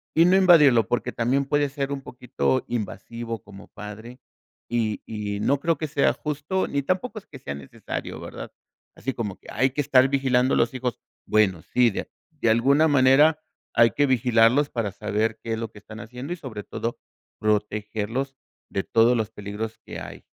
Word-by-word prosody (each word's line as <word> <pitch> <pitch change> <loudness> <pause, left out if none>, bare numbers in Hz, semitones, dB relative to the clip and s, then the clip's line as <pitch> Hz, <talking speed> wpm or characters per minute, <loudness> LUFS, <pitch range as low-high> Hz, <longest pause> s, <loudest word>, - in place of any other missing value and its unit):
y 165 +1 +6
no 180 +2 +5
invadirlo, 150 - +6
porque 120 - -1
también 130 +4 +1
puede 145 +1 +1
ser 140 0 -3
un 135 - -5
poquito 125 0 -1
invasivo 115 0 -5
como 100 -1 -13
padre, 110 +4 -9 0.5
y 115 -3 -1
y 105 -2 -4
no 140 +5 +2
creo 165 +2 +1
que 155 - -3
sea 140 -1 +2
justo, 150 +5 -2
ni 140 - -1
tampoco 200 - -2
es - - -24
que 140 - -11
sea 70 - -5
necesario, 70 -1 -6
¿verdad?, - - -8 0.5
así 135 - -3
como 105 -6 -4
que - - -19
hay 130 - +2
que 135 - -7
estar 130 -1 +4
vigilando 130 -2 +2
a - - +2
los 115 - +2
hijos. 125 -2 -3 0.3
Bueno, 95 -6 +2
sí, 125 -2 +3
de - - -3
a - - -13 0.2
de 145 -7 0
alguna 140 +8 +4
manera 145 +3 +5 0.4
hay 115 -1 +6
que 145 - +2
vigilarlos 125 +2 +4
para 115 -4 -2
saber 105 +3 -1
qué 115 - -2
es 110 - -2
lo 115 -1 -5
que 105 - -13
están 110 +2 -11
haciendo, 125 +8 -6
y 175 - -7
sobre 110 -9 -7
todo 115 +3 -4 0.4
protegerlos 105 +5 -1 0.4
de 95 - -1
todos 115 +2 +4
los 110 -2 -1
peligros 105 +2 -6
que - - -7
hay. - - -9
125 Hz, 190 wpm, -24 LUFS, 110-140 Hz, 0.5 s, y